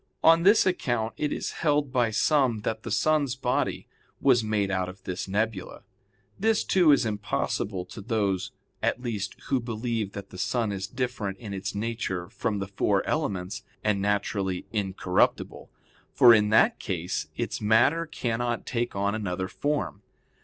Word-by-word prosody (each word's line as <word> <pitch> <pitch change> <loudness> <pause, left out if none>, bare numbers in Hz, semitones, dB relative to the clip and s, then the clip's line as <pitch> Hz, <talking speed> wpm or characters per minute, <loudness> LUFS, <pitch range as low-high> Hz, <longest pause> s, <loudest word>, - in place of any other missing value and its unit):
On 165 +1 +7
this 210 +5 +5
account 120 - 0
it 150 +5 -2
is - - -3
held 145 -3 0
by 120 -3 +3
some 125 -1 +2
that 110 +1 -3
the 115 - -6
sun's 145 +3 +2
body 125 -2 -1 0.3
was 125 -4 +4
made 105 -2 0
out 95 -1 -1
of 95 +1 -12
this 90 +1 -4
nebula. 105 0 -2 0.6
This, 220 +1 +2
too, 175 -5 +4
is 140 -3 +4
impossible 105 -2 -2
to 105 - -10
those 100 -4 -1 0.3
at 125 - 0
least 105 -5 -3
who 135 - +2
believe 115 -3 -3
that 100 -1 -8
the 90 - -9
sun 115 +2 0
is 95 -1 -4
different 120 -5 -3
in 105 -3 -7
its 100 +1 -4
nature 105 -5 -3
from 110 -3 -2
the 100 -1 -3
four 100 0 +1
elements, 105 - -2 0.2
and 105 -2 +1
naturally 100 -2 -1
incorruptible. 95 -3 0 0.5
For 120 -1 +8
in 105 -2 +4
that 110 - +4
case 85 -4 -3
its - - -3
matter 125 +10 +3
cannot 120 -5 -2
take 120 -2 -2
on 100 +1 0
another 95 -4 -2
form. 145 -1 -2
110 Hz, 160 wpm, -27 LUFS, 100-125 Hz, 0.6 s, For